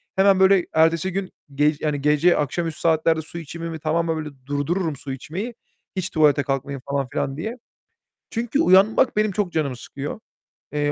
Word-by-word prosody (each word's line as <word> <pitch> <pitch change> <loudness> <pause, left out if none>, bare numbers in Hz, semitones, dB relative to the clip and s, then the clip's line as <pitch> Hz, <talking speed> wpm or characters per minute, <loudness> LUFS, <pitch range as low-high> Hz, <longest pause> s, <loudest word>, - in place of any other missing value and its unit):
Hemen 190 0 +5
böyle 190 -1 +5
ertesi 165 +3 +3
gün, 190 0 -3 0.2
ge 150 +2 +3
yani 150 -2 -1
gece 150 +4 +4
akşamüstü 160 +2 -2
saatlerde 160 0 +2
su 165 +2 -10
içimimi 165 0 -6
tamamen 165 +1 0
böyle 155 -1 -4 0.2
durdururum 145 +4 -1
su 135 0 -6
içmeyi. 190 - -5 0.4
Hiç 185 -1 -2
tuvalete 150 -3 +3
kalkmayayım 135 0 -3
falan 140 -2 0
filan 135 +1 -2
diye. 220 +10 -4 0.7
Çünkü 240 +5 -1
uyanmak 210 - +4
benim 215 -1 +2
çok 190 -2 -1
canımı 140 -5 -1
sıkıyor. 140 - -7 0.5
Eee, 145 0 +1
160 Hz, 160 wpm, -23 LUFS, 145-190 Hz, 0.7 s, Hemen